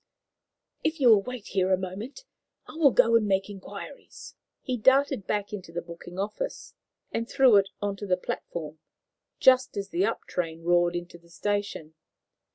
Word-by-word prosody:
"If 315 +1 -1
you 255 -4 +5
will 215 -3 +7
wait 250 -1 -7
here 190 -1 +1
a 185 - +4
moment, 205 - -7 0.4
I - - -12
will 315 -3 +5
go 230 -2 +4
and 220 -2 +3
make 195 +1 0
inquiries." 200 +7 -10 0.3
He 255 - -2
darted 265 -3 +3
back 205 0 -2
into 185 -5 -7
the 175 +1 -4
booking 170 +1 -10
office - - -4 0.4
and 230 +1 -3
through 260 -6 +6
it 195 -1 +3
on 200 -1 -2
to 205 - -6
the 180 -1 +2
platform, 160 -3 -6 0.6
just 255 -3 +4
as 200 0 -3
the 185 +1 +1
up 230 - -3
train 165 -2 -4
roared 175 0 +3
into 175 0 -6
the 170 0 -23
station. 200 -4 -3
200 Hz, 170 wpm, -27 LUFS, 175-240 Hz, 0.6 s, will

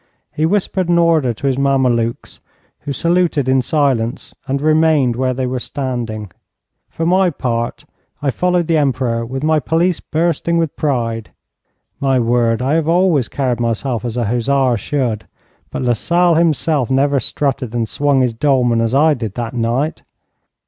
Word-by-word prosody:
He 155 +1 0
whispered 190 -1 0
an 175 - +3
order 165 -7 +3
to 115 +5 -7
his 135 -1 +1
Mamelukes, 125 -4 0 0.4
who 145 - -6
saluted 170 -2 +1
in 130 0 +3
silence 130 -4 -1
and 135 +1 -1
remained 155 -4 +3
where 130 +1 -1
they 130 0 -2
were 125 0 -2
standing. 120 -7 -4 0.6
For 165 - -4
my 185 +2 +3
part, 120 -6 -3 0.3
I 140 -2 0
followed 180 +3 +1
the 165 0 +1
Emperor 130 -5 0
with 135 +3 -5
my 155 0 +3
pelisse 165 +3 0
bursting 170 +1 -1
with 165 -3 -1
pride. 115 -6 -2 0.7
My 135 -2 +2
word, 115 0 +1
I 135 +3 +1
have 160 -1 +1
always 170 -6 +2
carried 130 -4 -2
myself 120 +1 -2
as 120 -1 -4
a 120 - 0
hussar 125 +3 +1
should, 115 -4 -2 0.4
but - - -4
Lasalle 170 +9 +2
himself 160 -4 +1
never 140 +1 +2
strutted 130 -1 -2
and 115 -2 0
swung 140 +2 +1
his 125 -2 +1
dolman 120 -2 +2
as 115 +2 0
I 155 +2 +4
did 115 -7 -5
that 120 -2 -4
night. 120 +6 -1
135 Hz, 160 wpm, -17 LUFS, 120-155 Hz, 0.7 s, I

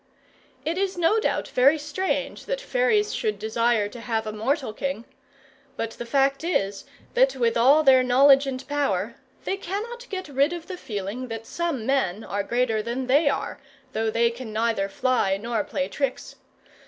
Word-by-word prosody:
It 335 +4 -1
is 385 -2 -1
no 350 +6 +3
doubt - - -1
very 275 +5 +4
strange 300 +6 -3
that - - -1
fairies 475 -4 +1
should 430 -2 -1
desire 225 -1 +1
to 240 - -10
have 225 -2 -2
a 215 - -3
mortal 225 +2 -1
king; 275 -1 -4 0.7
but 225 0 -2
the 240 - -8
fact 275 +2 +2
is, 200 - -1 0.3
that 265 +1 +4
with 235 -3 +1
all 275 +7 +5
their 265 -2 +7
knowledge 270 +2 +5
and 260 -1 -5
power, 290 -1 -1 0.3
they 390 - -1
cannot 455 +7 -5
get 375 -3 -4
rid 280 +3 +1
of 345 -2 -6
the 375 - -6
feeling 210 - -5
that 225 -1 -6
some 330 -9 -3
men 225 -7 0
are 205 - -2
greater 230 +1 0
than 240 +4 -3
they 285 +4 +4
are, 270 - -3 0.3
though 220 0 0
they 230 +1 +2
can 235 -1 -8
neither 220 -2 0
fly 250 -5 +1
nor 230 +2 -2
play 275 0 -2
tricks. 275 -3 -3
260 Hz, 175 wpm, -25 LUFS, 225-310 Hz, 0.7 s, their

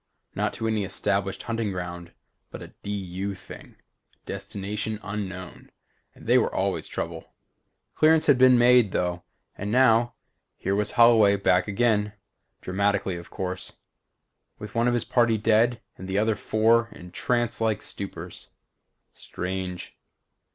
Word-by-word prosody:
Not - - -1
to 115 - -3
any 110 -2 0
established 100 0 -1
hunting 115 -3 -2
ground 85 -2 -6 0.4
but - - -9
a - - -11
D. - - -7
U. 100 0 -4
thing. 95 - -13 0.5
Destination 100 +2 -5
Unknown, 95 -3 -6 0.5
and - - -15
they - - +5
were - - 0
always - - -1
trouble. - - -6 0.6
Clearance 155 0 +4
had 140 -4 +4
been 130 -1 +7
made, 120 -4 +5
though, 90 -1 -1 0.3
and 100 +1 -4
now 120 -1 +4 0.4
here 95 - -2
was 105 +1 -1
Holloway 115 -4 +6
back 95 -1 +2
again 105 -1 +1 0.5
dramatically 100 0 0
of 85 0 -9
course 90 0 -5 0.8
with 105 0 -9
one 115 +1 +2
of 120 - +2
his 120 - 0
party 120 -2 +2
dead 115 +2 +2 0.2
and 95 - -7
the 95 +1 -1
other 110 +1 +2
four 110 +3 +2
in 90 0 -12
trance 120 +1 -1
like 110 -2 0
stupors. 100 -1 -7 0.6
Strange. 90 0 -5
105 Hz, 140 wpm, -25 LUFS, 95-115 Hz, 0.8 s, been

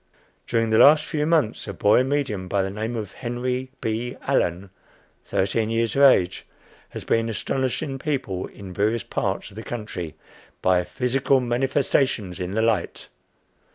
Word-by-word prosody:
During 115 -1 +1
the 110 - +4
last 150 +2 +7
few 150 -1 -1
months, 155 -12 +1
a 100 - -4
"boy 105 +7 +4
medium," 130 -9 -1
by 95 +1 +1
the 95 - -3
name 110 +4 -3
of 105 -4 -4
Henry 125 +2 -3
B. 115 +2 -2
Allen, 90 +3 0 0.5
thirteen 110 +4 0
years 115 0 0
of 140 - +2
age, 95 -10 +5 0.5
has - - -7
been 115 0 +1
astonishing 130 +4 -2
people 130 - -2
in 95 -2 -10
various 110 +4 0
parts 95 +1 -3
of 100 - -15
the - - -5
country 105 -9 -5 0.4
by 90 -1 +3
"Physical 130 +1 +1
Manifestations 125 -5 0
in 90 +2 -4
the 110 - +2
Light." 110 -6 -1
115 Hz, 155 wpm, -24 LUFS, 100-130 Hz, 0.5 s, last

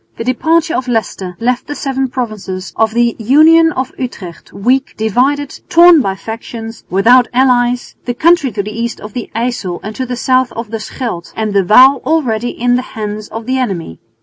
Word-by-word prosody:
The - - -4
departure 320 +7 +1
of 255 - -2
Leicester 195 -6 -3
left 245 +1 -1
the 290 - -5
seven 270 -1 -2
provinces 215 -7 -5
of 220 0 +1
the 235 -1 +2
Union 315 +8 +5
of 260 0 -3
Utrecht 195 -9 -7
weak, 255 +6 0
divided, 265 +6 0
torn 340 -2 +7
by 195 -5 -2
factions, 225 +1 -8
without 240 +7 +4
allies, 245 -1 +1
the 245 - -3
country 325 -3 +3
to 200 - -2
the 210 - -6
east 230 +1 -4
of 210 -1 -10
the 245 - -5
Yssel 225 -7 -2
and 215 +1 -6
to 260 - -3
the 250 - -3
south 255 0 +1
of 230 -2 -6
the 225 - -3
Scheldt 215 -6 -6
and 215 -2 -2
the 200 -1 +3
Waal 255 +8 +6
already 245 -6 0
in 245 +1 0
the - - -1 0.2
hands 210 0 -4
of 225 0 -7
the 260 +2 -1
enemy. 180 - -4
240 Hz, 190 wpm, -14 LUFS, 215-260 Hz, 0.2 s, torn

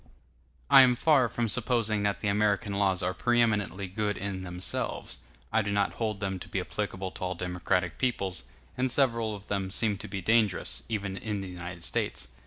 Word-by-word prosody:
I 135 - +9
am 125 -1 +5
far 135 -3 +4
from 120 +1 -1
supposing 115 -2 +1
that 100 0 0
the 105 - -1
American 100 0 +1
laws 95 -2 +1
are 90 +1 0
preeminently 105 -3 +1
good 105 +2 -2
in 100 -1 -4
themselves; 90 0 -3 0.3
I 110 - +4
do 105 -1 -2
not 100 0 +1
hold 110 -3 -2
them 95 -1 -2
to - - -10
be - - -1
applicable 95 0 -4
to - - -8
all 90 0 -2
democratic 90 0 -1
peoples; 95 -9 -1 0.3
and 130 +1 0
several 115 -5 +1
of 100 0 -12
them 95 -2 -1
seem 105 0 +2
to 110 - -6
be 95 -1 -4
dangerous, 105 -1 +1
even 100 -3 -3
in 105 0 -3
the 95 - -6
United 90 -1 -7
States. - - -1
100 Hz, 190 wpm, -29 LUFS, 95-110 Hz, 0.3 s, I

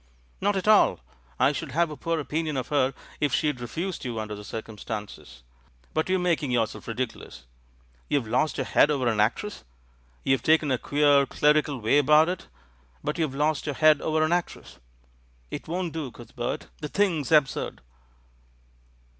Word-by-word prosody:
"Not 205 +1 +2
at 190 +1 -2
all; 215 -1 +5 0.4
I - - +5
should - - -5
have 165 +1 +2
a - - -6
poor 165 +2 -2
opinion 155 0 -2
of 125 - -3
her 135 -3 +1 0.2
if 145 - +1
she'd 150 -5 0
refused 170 +9 -4
you 120 -4 -3
under 105 -1 -4
the 105 0 -8
circumstances. 105 - -7 0.5
But 160 - 0
you're 190 - +3
making 170 -5 0
yourself 115 -3 -1
ridiculous. 115 - -5 0.6
You've 140 -5 +1
lost 155 +7 +1
your 135 - -1
head 150 - +4
over 135 -4 0
an 110 -3 +1
actress; 120 - 0 0.6
you've 135 -3 +2
taken 155 0 +3
a 130 - +1
queer, 145 +1 +3
clerical 150 -1 +2
way 115 +5 +3
about 150 +3 +5
it, 180 0 -5 0.6
but 150 +3 -2
you've 155 -5 -1
lost 150 +1 0
your 145 - -2
head 155 -2 +5
over 155 0 +1
an 155 - +1
actress. 175 -1 -4 0.7
It - - -6
won't 175 0 -3
do, 155 -5 -4
Cuthbert, 120 0 -6
the 150 - -4
thing's 165 -4 0
absurd." 150 -4 +2
150 Hz, 165 wpm, -26 LUFS, 125-160 Hz, 0.7 s, all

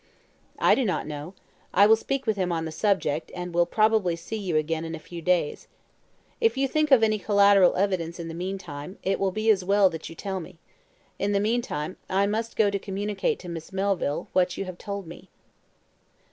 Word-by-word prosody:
"I - - +4
do 270 - +2
not 195 -6 -1
know. 150 +4 -7 0.4
I 200 - +7
will 220 +2 +7
speak 270 +4 -3
to 220 - +2
him 185 -3 -1
on 165 -1 -1
the 160 - -5
subject, 165 -4 0
and 180 -1 -5
will 175 0 +3
probably 215 -5 +2
see 170 +6 -7
you 190 -7 -1
again 160 +1 -1
in 165 0 -5
a - - -8
few 170 +2 -9
days. 175 -3 0 0.7
If 455 - +2
you 270 0 +2
can - - -19
think 310 -1 +2
of 265 -5 +6
any 215 -1 +2
collateral 200 -2 +5
evidence 180 -3 -1
in 170 - -5
the 165 - -6
meantime, 180 -2 -6
it 195 +1 0
will 195 - +2
be 215 +4 +2
as 190 -3 +1
well 195 0 +4
that 160 -1 -7
you 165 - -10
tell 190 +2 -4
me. 180 0 -11 0.6
In 205 +1 0
the 200 - +3
meantime, 205 -7 -2
I 195 +1 +2
must 220 +3 -2
go 210 -2 +3
to 200 - -1
communicate 200 +1 -2
to 180 - -10
Miss 165 0 -7
Melville 190 -6 -1
what 180 -1 +2
you 195 - -3
have 185 -1 -8
told 200 -1 -5
me." 165 - -12
190 Hz, 215 wpm, -26 LUFS, 170-205 Hz, 0.7 s, I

